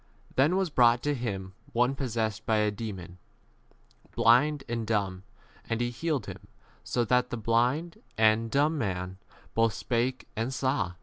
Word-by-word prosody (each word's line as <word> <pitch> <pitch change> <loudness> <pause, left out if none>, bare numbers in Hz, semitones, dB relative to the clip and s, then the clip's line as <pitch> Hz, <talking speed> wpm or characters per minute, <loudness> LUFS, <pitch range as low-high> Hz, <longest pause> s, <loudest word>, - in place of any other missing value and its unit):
Then 145 +7 +4
was 190 -4 0
brought 120 -3 +4
to 145 - +1
him 100 -7 -4 0.2
one 125 +3 +3
possessed 110 -5 -2
by 110 - +3
a 105 0 +2
demon, 95 -5 -7 1.0
blind 135 +5 +4
and 115 -2 -3
dumb, 100 -4 -1 0.5
and 115 - 0
he 120 0 0
healed 155 +3 -2
him, - - -9 0.4
so 120 - 0
that 125 +2 +2
the 120 - -3
[blind 125 - 0 0.2
and] 110 +1 +4
n - - -6
dumb 150 +4 +2
[man] 95 -4 -3 0.3
both 115 -2 +2
spake 125 +2 -1
and 115 +4 -2
saw. 130 -9 0
115 Hz, 160 wpm, -28 LUFS, 110-130 Hz, 1.0 s, Then